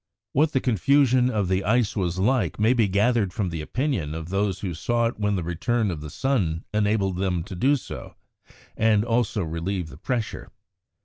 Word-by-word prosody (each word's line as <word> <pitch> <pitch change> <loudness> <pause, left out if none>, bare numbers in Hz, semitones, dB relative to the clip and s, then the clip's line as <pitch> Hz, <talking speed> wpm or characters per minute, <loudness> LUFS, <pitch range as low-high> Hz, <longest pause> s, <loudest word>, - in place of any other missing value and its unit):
What 150 +3 +2
the 135 - +3
confusion 125 +2 +3
of 105 -6 0
the 95 +1 0
ice 115 +1 +1
was 90 -4 -1
like 105 - +1
may 110 +4 +4
be 115 -4 +3
gathered 105 +1 +2
from 95 -1 -2
the 80 -2 -4
opinion 95 - -2
of 80 +1 -6
those 100 0 -1
who 95 -4 -3
saw 120 +8 0
it 115 -1 -2
when 105 -1 +1
the 90 - -2
return 105 +6 0
of 80 -4 -5
the 75 - -7
sun 90 - -1
enabled 105 -3 +1
them 90 -3 0
to 95 - -9
do 135 +10 +3
so, 135 - -8 0.6
and 110 -1 +3
also 115 -4 0
relieved 85 +2 -3
the 65 - -12
pressure. 115 +3 -3
105 Hz, 190 wpm, -25 LUFS, 90-120 Hz, 0.6 s, may